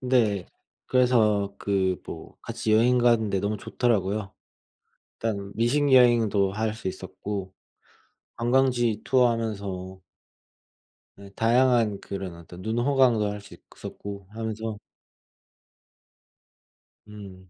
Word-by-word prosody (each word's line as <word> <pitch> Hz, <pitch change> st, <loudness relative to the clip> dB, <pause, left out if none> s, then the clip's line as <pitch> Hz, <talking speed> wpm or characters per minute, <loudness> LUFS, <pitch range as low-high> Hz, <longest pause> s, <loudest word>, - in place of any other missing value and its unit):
네 115 Hz, -7 st, +1 dB, 0.4 s
그래서 110 Hz, -6 st, +2 dB
그 95 Hz, -2 st, +1 dB
뭐 -, -, -9 dB
같이 110 Hz, -, -2 dB
여행 125 Hz, +3 st, +4 dB
가는 115 Hz, -3 st, +3 dB
데 95 Hz, -, 0 dB
너무 105 Hz, +2 st, -1 dB
좋더라고요. 105 Hz, -4 st, -1 dB, 0.8 s
일단 100 Hz, -3 st, -3 dB
미식 140 Hz, +5 st, +2 dB
여행도 115 Hz, -6 st, +4 dB
할 110 Hz, +2 st, -1 dB
수 110 Hz, -, -6 dB
있었고 95 Hz, 0 st, -6 dB, 0.8 s
관광지 120 Hz, -2 st, +1 dB
투어하면서 100 Hz, -7 st, 0 dB, 1.1 s
네 100 Hz, 0 st, -13 dB
다양한 115 Hz, -3 st, +3 dB
그런 95 Hz, -3 st, -6 dB
어떤 85 Hz, +2 st, -12 dB
눈호강도 120 Hz, -1 st, +2 dB
할 105 Hz, 0 st, -6 dB
수 100 Hz, -, -13 dB, 0.2 s
있었고 100 Hz, -2 st, -8 dB
하면서 110 Hz, 0 st, -5 dB, 2.3 s
음. 95 Hz, -3 st, -12 dB
110 Hz, 210 characters per minute, -26 LUFS, 100-120 Hz, 2.3 s, 여행